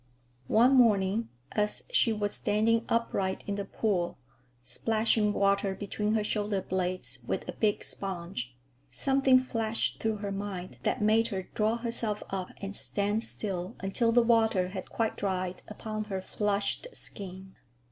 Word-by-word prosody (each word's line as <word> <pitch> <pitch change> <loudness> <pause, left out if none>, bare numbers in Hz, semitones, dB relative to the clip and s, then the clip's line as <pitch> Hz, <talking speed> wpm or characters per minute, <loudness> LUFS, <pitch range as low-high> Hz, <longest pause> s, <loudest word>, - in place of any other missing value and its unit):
One 245 +4 +5
morning, 220 -3 +4 0.2
as 210 0 +1
she 375 - +4
was 210 -2 0
standing 225 +2 +3
upright 200 -5 0
in 200 - -2
the 200 0 -3
pool, 195 -4 -1 0.5
splashing 220 - +2
water 200 -1 +2
between 210 +2 -1
her 215 - +2
shoulder 210 -1 0
blades 185 0 -2
with - - -2
a - - -2
big 210 -2 +1
sponge, 170 -10 -5 0.3
something 265 - +4
flashed 230 -3 -1
through 220 -1 0
her 205 -1 -4
mind 195 -2 -5
that 230 - 0
made 220 +2 +4
her 195 -4 -3
draw 215 +1 +2
herself 230 -3 -1
up 190 -2 -3
and 200 0 -3
stand 205 +2 +2
still 185 -5 -2
until 210 +5 +1
the 240 +1 +5
water 220 -5 +3
had 185 -1 -6
quite 225 -1 -1
dried 185 -2 -2
upon 215 0 -5
her 195 -2 -3
flushed 205 - -1
skin. 190 -1 -6
210 Hz, 145 wpm, -29 LUFS, 190-225 Hz, 0.5 s, One